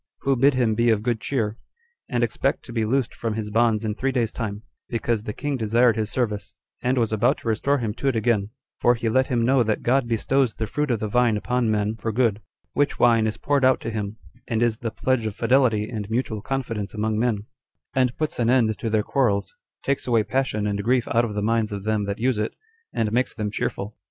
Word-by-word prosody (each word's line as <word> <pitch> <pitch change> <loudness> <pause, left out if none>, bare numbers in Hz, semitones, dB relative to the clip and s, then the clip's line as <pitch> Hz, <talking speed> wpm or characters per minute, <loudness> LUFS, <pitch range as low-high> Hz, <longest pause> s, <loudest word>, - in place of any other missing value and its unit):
Who 135 0 +2
bid 135 +2 +4
him 120 -4 +2
be 115 +2 +2
of 110 -2 +2
good 115 -2 0
cheer, 115 -4 -1 0.5
and 120 -2 +1
expect 120 +4 0
to 120 - -9
be 115 -2 0
loosed 130 +2 0
from 115 -2 -3
his 105 -1 -4
bonds 115 0 +2
in 105 - 0
three 135 +5 -1
days' 120 -4 0
time, 105 -2 -4 0.3
because 115 -1 -1
the 105 - -5
king 145 +2 -2
desired 115 +1 +3
his 110 -1 -1
service, 105 -5 -2 0.3
and 125 +2 +1
was 115 -3 +1
about 110 +3 +2
to - - -10
restore 125 +6 +1
him 115 -5 -2
to 135 - -3
it 135 - +2
again; 110 -3 +1 0.3
for 120 - +4
he 115 -1 -1
let 130 +3 +2
him 120 -2 +1
know 130 +1 +4
that 110 -2 0
God 130 0 +2
bestows 120 +2 +1
the 110 - -2
fruit 150 +7 -2
of 115 -4 0
the 110 - -1
vine 115 0 +2
upon 125 +2 0
men 105 +1 0
for 115 - -2
good; 110 -2 +1 0.3
which 145 0 +1
wine 115 -2 +4
is 110 - -3
poured 140 -1 +1
out 130 0 +5
to 115 - -4
him, 105 -1 -4 0.3
and 115 -1 +1
is 115 -2 +1
the 115 - -2
pledge 125 0 0
of 105 - -5
fidelity 115 -3 +2
and 105 -4 -5
mutual 110 -2 -1
confidence 115 -5 -3
among 110 0 0
men; 110 -3 0 0.5
and 125 -2 +1
puts 155 -4 -2
an 120 -1 +2
end 115 -4 +3
to 115 - -2
their 110 -1 +2
quarrels, 105 -8 0 0.3
takes 140 -1 -1
away 115 -3 +3
passion 125 -4 -1
and 100 -1 -1
grief 125 +2 +2
out 120 +1 +3
of 105 -3 -5
the 105 - -1
minds 115 0 +1
of 100 -1 -5
them 110 -1 0
that 100 +1 -3
use 125 -1 +1
it, 105 - -2 0.4
and 110 -2 -1
makes 125 +2 0
them 105 -3 -2
cheerful. 105 0 -3
115 Hz, 235 wpm, -24 LUFS, 105-125 Hz, 0.5 s, out